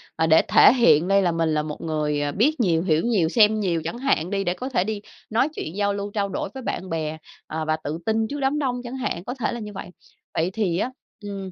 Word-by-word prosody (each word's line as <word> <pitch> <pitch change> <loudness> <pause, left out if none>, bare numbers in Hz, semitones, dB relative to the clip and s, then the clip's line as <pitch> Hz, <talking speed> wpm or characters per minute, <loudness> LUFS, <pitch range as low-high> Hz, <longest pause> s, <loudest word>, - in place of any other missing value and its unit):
à, 160 0 +1
để 160 0 +6
thể - - +7
hiện 185 - +4
đây 195 0 +4
là 180 -2 +2
mình 165 -1 0
là 150 0 +1
một 150 -1 -6
người, 150 -2 -1
à, 145 0 -1
biết 270 - +1
nhiều, 170 -7 +2
hiểu 160 -4 +2
nhiều, 200 -9 +2
xem 215 +2 +4
nhiều 175 -5 0
chẳng 170 +9 -4
hạn 245 - 0
đi 195 0 -1
để 175 - 0
có 255 +8 -5
thể 235 -9 +1
đi 210 0 -4 0.3
nói 235 +6 +2
chuyện 160 - -5
giao 205 -1 +1
lưu, 200 0 -4
trao 200 -1 -1
đổi 190 - -3
với 265 - -7
bạn 190 -5 -4
bè, 160 -1 -3 0.3
ờ, 160 0 -3
và 155 0 +1
tự 155 +3 -3
tin 220 0 +1
trước 290 +5 -5
đám 275 +2 +1
đông 250 -4 -1
chẳng 250 +2 -6
hạn, 240 -10 -3
có 245 - -4
thể 255 -4 -2
là 235 - -4
như 210 -2 -7
vậy. 190 - -7 0.4
Vậy 165 +2 0
thì 190 -6 0
á, 245 +7 -1 0.3
ừm, 195 -2 -6
195 Hz, 265 wpm, -23 LUFS, 160-230 Hz, 0.4 s, thể